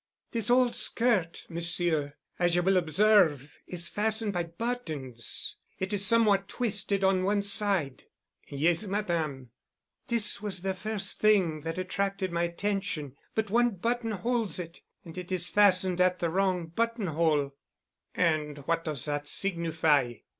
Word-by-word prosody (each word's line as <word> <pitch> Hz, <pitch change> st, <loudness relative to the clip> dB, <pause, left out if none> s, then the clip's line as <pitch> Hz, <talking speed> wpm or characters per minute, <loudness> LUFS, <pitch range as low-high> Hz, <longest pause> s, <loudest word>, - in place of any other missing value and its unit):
"This 230 Hz, -1 st, -2 dB
old 245 Hz, 0 st, +3 dB
skirt, 220 Hz, -9 st, 0 dB
Monsieur, 165 Hz, -3 st, -1 dB, 0.2 s
as 175 Hz, -1 st, +2 dB
you 175 Hz, -, +2 dB
will 190 Hz, +1 st, +3 dB
observe, 165 Hz, -5 st, +3 dB
is 170 Hz, -1 st, -3 dB
fastened 220 Hz, +1 st, 0 dB
by 175 Hz, -2 st, -1 dB
buttons 165 Hz, -, -4 dB, 0.2 s
and 190 Hz, +2 st, -2 dB
is 200 Hz, -1 st, +3 dB
somewhat 205 Hz, -2 st, +4 dB
twisted 205 Hz, -3 st, -1 dB
to 190 Hz, -1 st, +3 dB
one 200 Hz, +1 st, +1 dB
side." 200 Hz, -9 st, +2 dB, 0.4 s
"Yes, 160 Hz, +6 st, +2 dB
Madame." 165 Hz, -, -2 dB, 0.6 s
"This 230 Hz, -5 st, -1 dB
was 190 Hz, -4 st, -3 dB
the 190 Hz, 0 st, 0 dB
first 210 Hz, +2 st, -4 dB
thing 185 Hz, -8 st, +3 dB
that 165 Hz, +3 st, -5 dB
attracted 195 Hz, 0 st, -2 dB
my 170 Hz, 0 st, 0 dB
attention. 170 Hz, -5 st, -3 dB, 0.2 s
But 220 Hz, -2 st, -1 dB
one 240 Hz, -1 st, +2 dB
button 230 Hz, +4 st, -1 dB
holds 225 Hz, +1 st, -1 dB
it, 170 Hz, -2 st, -8 dB, 0.2 s
and 165 Hz, -, -10 dB
it 180 Hz, 0 st, -9 dB
is 180 Hz, -2 st, -1 dB
fastened 185 Hz, -3 st, +3 dB
at 180 Hz, 0 st, +3 dB
the 170 Hz, -2 st, -1 dB
wrong 185 Hz, -1 st, 0 dB
button 230 Hz, +6 st, -2 dB
hole." 155 Hz, -4 st, +1 dB, 0.6 s
"And 155 Hz, -4 st, 0 dB
what 165 Hz, +1 st, 0 dB
does 150 Hz, -5 st, -4 dB
that 145 Hz, -1 st, -3 dB
signify?" 160 Hz, -9 st, +1 dB
185 Hz, 145 wpm, -28 LUFS, 165-205 Hz, 0.6 s, somewhat